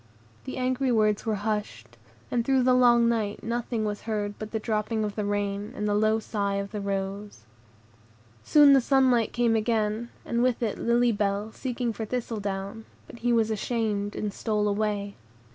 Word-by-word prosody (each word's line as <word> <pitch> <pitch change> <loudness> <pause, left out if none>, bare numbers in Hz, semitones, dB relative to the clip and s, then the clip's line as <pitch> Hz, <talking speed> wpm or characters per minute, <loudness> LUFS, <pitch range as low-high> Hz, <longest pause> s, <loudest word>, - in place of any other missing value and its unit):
The 260 - -5
angry 255 +1 0
words 215 -1 +2
were 220 - +1
hushed, 200 - -4 0.4
and 240 -1 +1
through 265 0 +2
the 255 0 +4
long 240 -2 +5
night 220 -3 -1
nothing 235 -1 -2
was 210 0 -3
heard 205 -1 -1
but 215 - -5
the 220 - -2
dropping 215 0 -1
of 210 -1 -2
the 210 - -3
rain, 205 0 -2
and 210 - -2
the 205 - +1
low 215 +1 +3
sighs 200 -2 -2
of 200 - -10
the 210 -1 -4
rose. 195 - -4 1.0
Soon 290 -2 +7
the 270 - +6
sunlight 255 -3 +3
came 240 -2 +2
again, 220 0 0 0.2
and 235 0 0
with 250 -1 +1
it 215 - -2
Lily 240 +1 +3
Bell 205 0 -1
seeking 245 -1 -3
for 220 - -5
Thistledown; 210 -3 -4 0.2
but 235 - -12
he 240 +1 0
was 225 -2 +2
ashamed, 215 -2 -1
and 210 -2 -3
stole 210 -1 -1
away. 205 -1 -1
215 Hz, 180 wpm, -27 LUFS, 205-235 Hz, 1.0 s, Soon